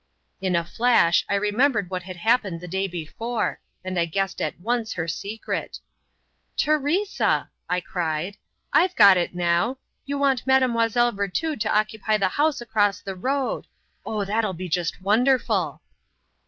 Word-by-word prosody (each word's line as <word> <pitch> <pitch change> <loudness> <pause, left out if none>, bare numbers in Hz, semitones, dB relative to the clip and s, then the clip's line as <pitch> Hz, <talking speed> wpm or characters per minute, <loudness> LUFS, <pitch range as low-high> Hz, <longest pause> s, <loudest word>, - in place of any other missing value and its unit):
In 185 -2 0
a 170 -1 +1
flash 225 -4 +3
I 200 - +2
remembered 210 0 +1
what 185 -1 -2
had 185 +1 -8
happened 205 -3 +1
the 180 - -9
day 190 +2 -1
before, 195 +7 -3 0.3
and 185 -1 -2
I 170 - +3
guessed 195 +3 -2
at - - -3
once 230 +3 -1
her 165 -1 -3
secret. 205 +7 -4 0.8
"Teresa!" 305 +7 +1 0.2
I 180 0 +1
cried, 170 +2 -3 0.4
"I've 350 +5 +4
got 200 -3 +8
it 175 0 -1
now! 175 +8 +1 0.3
You 285 0 -2
want 270 -3 +1
Mademoiselle 240 -2 +3
Virtud 220 - -2
to 215 -1 +2
occupy 215 0 0
the 195 -2 +1
house 295 +4 +1
across 205 -4 +1
the 195 - -6
road. 265 +8 -2 0.4
Oh, 210 -2 -2
that'll 215 0 0
be 180 +1 -6
just 175 +1 -2
wonderful!" 215 - +1
205 Hz, 150 wpm, -24 LUFS, 180-245 Hz, 0.8 s, got